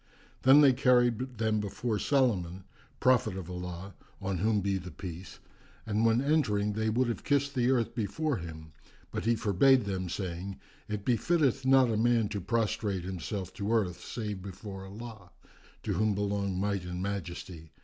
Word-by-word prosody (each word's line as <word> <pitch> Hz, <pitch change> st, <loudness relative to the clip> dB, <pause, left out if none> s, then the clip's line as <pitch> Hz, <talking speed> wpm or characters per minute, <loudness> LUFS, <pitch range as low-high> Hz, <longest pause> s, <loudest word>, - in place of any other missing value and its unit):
Then 135 Hz, +3 st, +7 dB
they 140 Hz, -3 st, +7 dB
carried 125 Hz, -1 st, +2 dB
them 110 Hz, -1 st, +1 dB
before 105 Hz, +2 st, -2 dB
Solomon, 95 Hz, -11 st, +1 dB, 0.4 s
prophet 125 Hz, -7 st, +3 dB
of 90 Hz, -1 st, -6 dB
Allah 90 Hz, +2 st, -6 dB, 0.3 s
(on 95 Hz, -2 st, -2 dB
whom 105 Hz, +2 st, +2 dB
be 100 Hz, 0 st, 0 dB
the 90 Hz, 0 st, -8 dB
Peace!), 90 Hz, +1 st, -8 dB, 0.5 s
and 110 Hz, 0 st, 0 dB
when 115 Hz, +3 st, +3 dB
entering 105 Hz, -9 st, +1 dB
they 110 Hz, +1 st, 0 dB
would 125 Hz, +3 st, +1 dB
have 120 Hz, -, -3 dB
kissed 140 Hz, -1 st, +1 dB
the 125 Hz, -2 st, +2 dB
earth 120 Hz, -3 st, +1 dB
before 125 Hz, +6 st, -1 dB
him; 80 Hz, -3 st, -8 dB, 0.4 s
but -, -, -4 dB
he 115 Hz, +1 st, +3 dB
forbade 115 Hz, +4 st, +4 dB
them, 95 Hz, -2 st, -3 dB
saying, 95 Hz, +1 st, -4 dB, 0.3 s
"It 105 Hz, -2 st, -4 dB
befitteth 130 Hz, +1 st, +2 dB
not 130 Hz, -2 st, +5 dB
a 110 Hz, -, 0 dB
man 115 Hz, -1 st, +2 dB
prostrate 105 Hz, -2 st, -1 dB
himself 95 Hz, +1 st, -5 dB
to 100 Hz, +2 st, -3 dB
earth 100 Hz, -7 st, 0 dB
save 105 Hz, -5 st, -5 dB
before 95 Hz, 0 st, -8 dB
Allah 105 Hz, -2 st, -9 dB, 0.5 s
(to -, -, -1 dB
whom 110 Hz, -1 st, +1 dB
belong 100 Hz, -2 st, -1 dB
Might 100 Hz, -1 st, -1 dB
and 90 Hz, 0 st, -4 dB
Majesty!) 90 Hz, -4 st, -5 dB
105 Hz, 160 wpm, -30 LUFS, 95-120 Hz, 0.5 s, Then